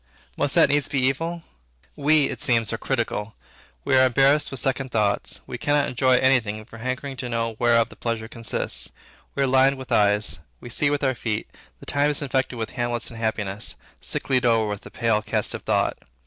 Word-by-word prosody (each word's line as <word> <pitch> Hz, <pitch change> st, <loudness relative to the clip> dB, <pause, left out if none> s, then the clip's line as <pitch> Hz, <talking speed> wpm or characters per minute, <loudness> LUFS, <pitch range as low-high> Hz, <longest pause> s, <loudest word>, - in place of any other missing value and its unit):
Must 145 Hz, -1 st, 0 dB
that -, -, +6 dB
needs 145 Hz, 0 st, +2 dB
be 140 Hz, -, 0 dB
evil? 165 Hz, +6 st, -1 dB, 0.5 s
We, 150 Hz, 0 st, +3 dB
it 130 Hz, -, -5 dB
seems, 115 Hz, -6 st, +2 dB
are -, -, -1 dB
critical; 115 Hz, -4 st, -2 dB, 0.5 s
we 135 Hz, -, +3 dB
are 130 Hz, -, +6 dB
embarrassed 135 Hz, +4 st, +3 dB
with 135 Hz, -, -3 dB
second 130 Hz, +1 st, -1 dB
thoughts; 105 Hz, -4 st, -1 dB
we 125 Hz, -, -7 dB
cannot 145 Hz, +2 st, +2 dB
enjoy 130 Hz, +1 st, +3 dB
any 130 Hz, 0 st, +5 dB
thing 110 Hz, -1 st, -6 dB
for 115 Hz, 0 st, -12 dB
hankering 130 Hz, +3 st, -4 dB
to 125 Hz, 0 st, -4 dB
know 115 Hz, -1 st, -2 dB
whereof 115 Hz, -1 st, +3 dB
the -, -, -14 dB
pleasure 115 Hz, -1 st, -3 dB
consists; 115 Hz, -1 st, -3 dB, 0.4 s
we 140 Hz, -, +1 dB
are -, -, +3 dB
lined 135 Hz, +1 st, +4 dB
with 130 Hz, -1 st, -10 dB
eyes; 105 Hz, -4 st, +3 dB, 0.2 s
we 120 Hz, -, -10 dB
see 145 Hz, +4 st, +2 dB
with 145 Hz, 0 st, -1 dB
our 130 Hz, -1 st, +2 dB
feet; 115 Hz, -3 st, -3 dB, 0.3 s
the -, -, -12 dB
time 145 Hz, +1 st, +1 dB
is 150 Hz, 0 st, 0 dB
infected 130 Hz, -2 st, -1 dB
with 110 Hz, -1 st, -4 dB
Hamlet's 120 Hz, -1 st, -2 dB
unhappiness, 110 Hz, -3 st, -2 dB, 0.3 s
"Sicklied 130 Hz, -1 st, -1 dB
o'er 115 Hz, -3 st, +3 dB
with 105 Hz, -1 st, -4 dB
the -, -, -11 dB
pale 115 Hz, -3 st, +1 dB
cast -, -, 0 dB
of -, -, -5 dB
thought. -, -, 0 dB
125 Hz, 200 wpm, -24 LUFS, 115-135 Hz, 0.5 s, that